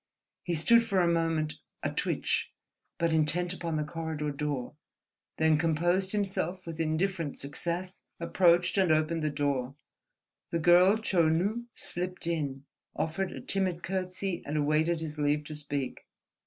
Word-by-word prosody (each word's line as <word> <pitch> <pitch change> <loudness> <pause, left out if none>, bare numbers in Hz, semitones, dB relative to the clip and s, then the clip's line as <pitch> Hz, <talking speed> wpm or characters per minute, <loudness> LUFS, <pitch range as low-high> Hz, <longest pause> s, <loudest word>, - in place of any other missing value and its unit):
He 175 - -2
stood 235 +9 +5
for 200 -5 +1
a 175 - +4
moment, 165 -2 0 0.2
a - - 0
twitch, - - -1 0.5
but 170 -1 +1
intent 170 +3 +3
upon 170 -3 -3
the 150 - 0
corridor 155 -1 -3
door, 140 -3 -3 0.6
then 160 -1 +4
composed 175 +4 +1
himself 190 -3 -2
with 165 -1 -7
indifferent 165 0 -1
success, 175 +6 -4 0.2
approached 175 +2 +3
and 185 -4 +4
opened 155 +1 +2
the 155 - +1
door. 140 -3 -1 0.7
The 170 - 0
girl 175 +4 +6
Chou 180 -7 +2
Nu 200 +9 0
slipped 180 0 -4
in, 140 -5 -2 0.3
offered 180 +4 -1
a - - -7
timid 185 -3 -1
courtesy, 185 0 -2
and 150 +2 -3
awaited 155 +3 +2
his 150 -1 -5
leave 150 0 +1
to 155 - -8
speak. 145 -3 -4
165 Hz, 145 wpm, -30 LUFS, 155-180 Hz, 0.7 s, girl